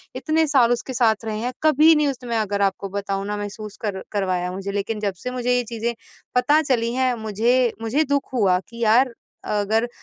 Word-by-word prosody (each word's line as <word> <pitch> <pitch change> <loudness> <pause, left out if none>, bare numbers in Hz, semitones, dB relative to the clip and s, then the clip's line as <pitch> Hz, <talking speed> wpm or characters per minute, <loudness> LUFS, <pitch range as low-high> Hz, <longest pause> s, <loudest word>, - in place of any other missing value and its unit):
इतने 315 0 +1
साल 255 -5 +4
उसके 255 +2 -4
साथ 225 -2 +2
रहे 215 -1 -3
हैं, 245 +3 -3
कभी 310 +1 +6
नहीं 300 -1 +2
उस 265 -2 -4
मैं 235 -1 -1
अगर 205 -1 -1
आपको 195 +1 -8
बताऊँ 195 0 -3
ना 210 0 -2
महसूस 205 +1 -7
कर 195 -2 -3
करवाया 185 -3 -1
मुझे 195 +2 -5
लेकिन 205 +2 -2
जब 205 -2 -1
से 250 - -3
मुझे 250 0 0
ये 245 - 0
चीज़ें 235 0 -3 0.4
पता 295 +5 +4
चली 240 -5 0
हैं 255 0 +1
मुझे 235 +4 +2
मुझे 255 +8 +1
दुःख 280 -2 -1
हुआ 195 -7 +3
कि 235 0 -5
यार 240 +3 +4 0.3
अगर 215 +3 0
230 Hz, 205 wpm, -22 LUFS, 205-255 Hz, 0.4 s, कभी